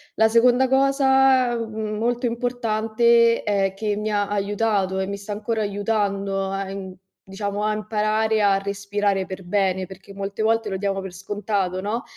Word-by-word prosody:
La 220 0 +4
seconda 245 +3 +4
cosa, 265 -2 +4
mhmm, 220 -2 -4
molto 240 +2 0
importante 235 -1 +2
è 195 -2 0
che 205 +1 -2
mi 210 +1 -2
ha 205 -1 +1
aiutato, 200 -1 0
e 190 - -1
mi 200 0 -4
sta 200 +1 -8
ancora 215 +2 -2
aiutando 200 -1 -1
a, 195 0 -2
uhm, 190 -1 -7 0.3
diciamo, 200 +1 -4
a 215 - +1
imparare 215 0 0
a 195 -1 +4
respirare 200 0 -1
per 190 0 -8
bene, 190 0 0
perché 190 +1 -12
molte 200 +2 -4
volte 225 +1 +1
lo 190 - -2
diamo 195 0 -2
per 190 -1 -7
scontato, 195 -1 -2
no, 220 +6 -2
210 Hz, 165 wpm, -23 LUFS, 195-225 Hz, 0.3 s, La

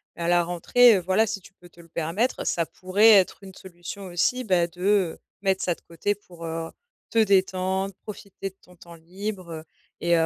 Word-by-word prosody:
et - - -9
à 170 - 0
la 175 -1 +3
rentrée, 215 +7 +5
heu, 190 - +2
voilà, 190 +5 +2
si 205 -2 -4
tu 185 - -16
peux 175 - -17
te 170 0 -17
le 165 - -19
permettre, 170 +10 -1
ça 170 - +1
pourrait 190 +6 +3
être 195 0 +4
une 190 -1 -11
solution 185 +2 -9
aussi, 250 +8 0
bah, 180 -4 +3
de 180 0 0 0.2
mettre 190 -1 +1
ça 175 - 0
de - - -25
côté 170 +5 -2
pour, 175 -4 -12
heu, 165 0 -4 0.4
te 230 - +1
détendre, 190 -1 +1
profiter 200 -2 -7
de - - -36
ton 180 0 -20
temps 170 0 -13
libre 175 -1 -7 0.3
et 170 0 +2
heu, 165 -1 +3
185 Hz, 205 wpm, -25 LUFS, 170-200 Hz, 0.4 s, rentrée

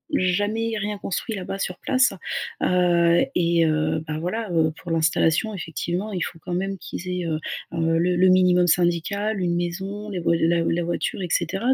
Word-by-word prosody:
jamais 205 +5 0
rien 205 0 -3
construit 200 +4 -3
là-bas, 195 0 -5
sur 180 -2 -4
place. 260 -4 +2 0.5
Heu, 175 -1 +3
et 170 -1 +3
heu, 155 0 +1
bah, 155 0 -3
voilà, 190 +5 -3
heu, 160 -2 +2
pour 175 - -7
l'installation, 165 +5 +2
effectivement, 175 +4 -3
il 180 - -2
faut 165 - -4
quand 175 +2 -6
même 195 +2 -2
qu'ils 185 - -7
aient, 180 -1 -2
heu 160 -2 -1 0.3
heu, 165 0 +1
le 180 +2 +2
le 185 +1 +4
minimum 180 -1 +4
syndical. 180 +5 +1
Une 175 -2 0
maison, 195 +4 -4
les 190 - -3
voi 170 0 +2
la 170 +1 +2
la 170 +1 0
voiture 175 +3 -2
et - - -2
cetera. 230 +7 +1
180 Hz, 185 wpm, -23 LUFS, 170-195 Hz, 0.5 s, le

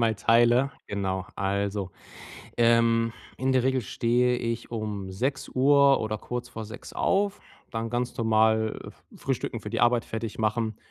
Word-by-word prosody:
mal 115 -1 +2
teile. 120 +5 +4 0.2
Genau. 95 -2 -2
Also, 100 0 -1 0.7
ähm, 115 -1 +3 0.2
in 130 0 0
der 130 -2 +3
Regel 130 -1 +1
stehe 125 +3 +1
ich 115 0 -4
um 105 -4 -4
6:00 135 +4 +3
oder 110 -1 -2
kurz 125 0 -5
vor 110 -1 -7
6:00 105 - -10
auf, 200 +1 +1 0.3
dann 115 0 -3
ganz 120 +1 -2
normal, 110 -1 +2 0.3
äh, - - -14
frühstücken, 125 -3 -3
für 105 - -7
die 115 - -2
Arbeit 120 -1 +3
fertig 110 -1 -5
machen 110 0 0
115 Hz, 150 wpm, -27 LUFS, 110-125 Hz, 0.7 s, teile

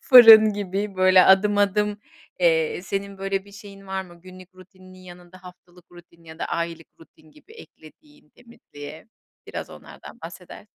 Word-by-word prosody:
fırın 225 -4 +8
gibi 200 0 -5
böyle 185 0 +5
adım, 205 +2 +3
adım, 205 +1 0 0.4
eee, 165 0 0
senin 195 0 -6
böyle 195 0 -4
bir 200 - -18
şeyin 195 -1 -14
var 190 0 -4
mı, 175 -2 -18
günlük 185 0 -16
rutininin 185 0 -18
yanında 180 0 -16
haftalık 180 -1 -18
rutin 170 -1 -19
ya 160 0 -14
da - - -4
aylık 170 -1 -5
rutin 155 -1 -22
gibi 440 - -21
eklediğin 300 -9 -19
temizliğe? 155 -8 -14 0.4
Biraz - - -8
onlardan - - -15
bahseder - - -12
185 Hz, 150 wpm, -22 LUFS, 175-205 Hz, 0.4 s, fırın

